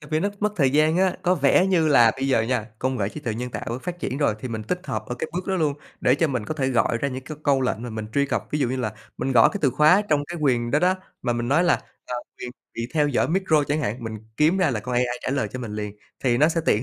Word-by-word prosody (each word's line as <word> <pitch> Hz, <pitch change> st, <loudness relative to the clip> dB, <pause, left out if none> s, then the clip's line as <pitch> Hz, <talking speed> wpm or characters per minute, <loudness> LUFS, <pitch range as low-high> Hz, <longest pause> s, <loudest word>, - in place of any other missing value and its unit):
À, 150 Hz, -, -13 dB
vì 155 Hz, +1 st, +1 dB
nó 200 Hz, -, +1 dB
mất 210 Hz, 0 st, +1 dB
thời 135 Hz, -5 st, +3 dB
gian 155 Hz, +3 st, +3 dB
á, 185 Hz, -1 st, +2 dB
có 180 Hz, +1 st, +3 dB
vẻ 145 Hz, +4 st, +4 dB
như 170 Hz, -5 st, +3 dB
là 120 Hz, -6 st, +6 dB
bây 135 Hz, +1 st, -1 dB
giờ 115 Hz, -4 st, +3 dB
nha, 115 Hz, -2 st, -1 dB
công 130 Hz, 0 st, -1 dB
nghệ 100 Hz, -, 0 dB
trí 150 Hz, -, -8 dB
tuệ 115 Hz, -6 st, -3 dB
nhân 125 Hz, +2 st, -4 dB
tạo 115 Hz, +1 st, -4 dB
phát 175 Hz, 0 st, -5 dB
triển 135 Hz, -4 st, -3 dB
rồi, 145 Hz, -8 st, +2 dB
thì 130 Hz, -, -5 dB
mình 110 Hz, -1 st, -4 dB
tích 180 Hz, -, -4 dB
hợp -, -, -3 dB
ở 125 Hz, -, -4 dB
cái -, -, -3 dB
bước 180 Hz, +2 st, -4 dB
đó 190 Hz, -, 0 dB
luôn 150 Hz, -4 st, +1 dB, 0.3 s
để 125 Hz, -, +4 dB
cho 160 Hz, +2 st, +1 dB
mình 125 Hz, -5 st, -2 dB
có 155 Hz, -, -4 dB
thể 135 Hz, -3 st, 0 dB
gọi 120 Hz, -2 st, +2 dB
ra 140 Hz, -, -1 dB
những 130 Hz, -1 st, -6 dB
cái 155 Hz, -, -7 dB
câu 140 Hz, -2 st, +3 dB
lệnh 125 Hz, -3 st, -1 dB
mà 120 Hz, -, -5 dB
mình 110 Hz, -1 st, -5 dB
truy 140 Hz, 0 st, +2 dB
cập. -, -, -2 dB
Ví 150 Hz, -, -1 dB
dụ 135 Hz, -5 st, +1 dB
như 130 Hz, -, -2 dB
là 110 Hz, -4 st, -2 dB, 0.3 s
mình 135 Hz, -, -1 dB
gõ 115 Hz, -2 st, +7 dB
cái 205 Hz, -, -4 dB
từ 135 Hz, -, +4 dB
khóa 155 Hz, -, +5 dB
trong 145 Hz, -2 st, +2 dB
cái 170 Hz, +2 st, -7 dB
quyền 120 Hz, -4 st, +1 dB
đó 150 Hz, -, +3 dB
đó, 180 Hz, +3 st, +3 dB, 0.3 s
mà 120 Hz, -, 0 dB
mình 120 Hz, +1 st, -2 dB
nói 160 Hz, +6 st, +3 dB
là, 175 Hz, -, +4 dB, 0.3 s
à, 125 Hz, -, -4 dB, 0.2 s
quyền 125 Hz, -, -6 dB, 0.2 s
bị 115 Hz, 0 st, -3 dB
theo 150 Hz, -2 st, +3 dB
dõi 135 Hz, -, +1 dB
micro 165 Hz, -4 st, +2 dB
chẳng 145 Hz, +2 st, -1 dB
hạn, 120 Hz, -2 st, -3 dB
mình 110 Hz, -1 st, -5 dB, 0.2 s
kiếm 160 Hz, +5 st, +3 dB
ra 180 Hz, -6 st, +3 dB
là 110 Hz, -, -2 dB
con 125 Hz, +4 st, -4 dB
AI 120 Hz, 0 st, 0 dB
trả -, -, -2 dB
lời 135 Hz, -6 st, 0 dB
cho 125 Hz, -, -5 dB
mình 120 Hz, -4 st, -6 dB
liền, 105 Hz, -1 st, -5 dB, 0.3 s
thì 120 Hz, -1 st, +3 dB
nó 155 Hz, +2 st, +5 dB
sẽ 165 Hz, 0 st, 0 dB
tiện 105 Hz, -, +3 dB
135 Hz, 315 wpm, -24 LUFS, 120-155 Hz, 0.3 s, gõ